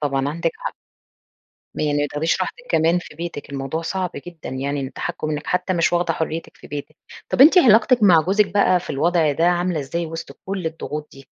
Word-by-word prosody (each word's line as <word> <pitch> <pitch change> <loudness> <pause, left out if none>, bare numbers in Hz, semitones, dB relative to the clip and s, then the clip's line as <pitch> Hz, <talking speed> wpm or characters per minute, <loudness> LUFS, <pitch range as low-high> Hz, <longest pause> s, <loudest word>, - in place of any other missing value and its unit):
طبعًا 140 -2 0
عندِك 165 +2 -1
حق. - - -5 1.0
يعني 145 -1 0
ما 145 - +1
تاخديش 160 +5 0
راحتِك 245 +6 -4
كمان 165 +2 +3
في 175 - -11
بيتِك 165 -3 -6
الموضوع 140 +3 -3
صعب 185 +1 -2 0.2
جدًا 175 -3 -9
يعني، 140 +2 -2
إن 135 0 -5
تَحكُم 155 - -4
إنِّك 150 0 -4
حتى 180 +1 0
مش 170 -2 +1
واخدة 175 0 +1
حريتِك 160 0 -4
في - - -14
بيتِك، 145 +1 -7 0.3
طَب - - -1
أنتِ 315 +7 +9
علاقتِك 235 -3 +5
مع 180 -5 +7
جوزِك 200 +4 +1
بقى 185 -3 +4
في - - -8
الوضع 160 +1 +2
ده 160 +4 0
عاملة 175 -2 +1
إزاي 165 +5 -3
وسط 165 -3 -8
كُلّ 190 -2 -3
الضغوط 150 -2 -5
دي؟ 135 0 -14
165 Hz, 200 wpm, -21 LUFS, 145-180 Hz, 1.0 s, أنتِ